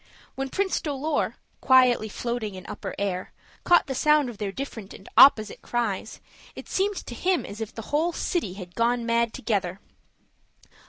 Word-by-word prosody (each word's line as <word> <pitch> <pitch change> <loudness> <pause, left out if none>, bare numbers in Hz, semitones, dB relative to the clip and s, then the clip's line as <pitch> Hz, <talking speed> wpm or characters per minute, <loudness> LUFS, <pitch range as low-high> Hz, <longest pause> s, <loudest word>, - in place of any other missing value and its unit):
When 270 0 -4
Prince 385 +6 0
Dolor, 295 0 -1 0.3
quietly 250 -4 +4
floating 235 -2 -3
in 185 - -9
upper - - -6
air, 190 -2 -3 0.3
caught 350 - +5
the 270 - -4
sound 300 -1 +3
of 215 - -15
their 205 -2 -2
different 225 -4 -7
and 190 - -14
opposite 220 -6 +6
cries, 225 -4 -3 0.4
it - - -9
seemed 395 +1 0
to - - -7
him 360 +8 0
as 210 +2 -8
if 220 - -4
the 225 - -8
whole 325 +4 +2
city 330 - -2
had 180 -3 -9
gone 235 +2 +1
mad 230 0 +1
together. 200 -8 -2
240 Hz, 165 wpm, -26 LUFS, 205-280 Hz, 0.4 s, opposite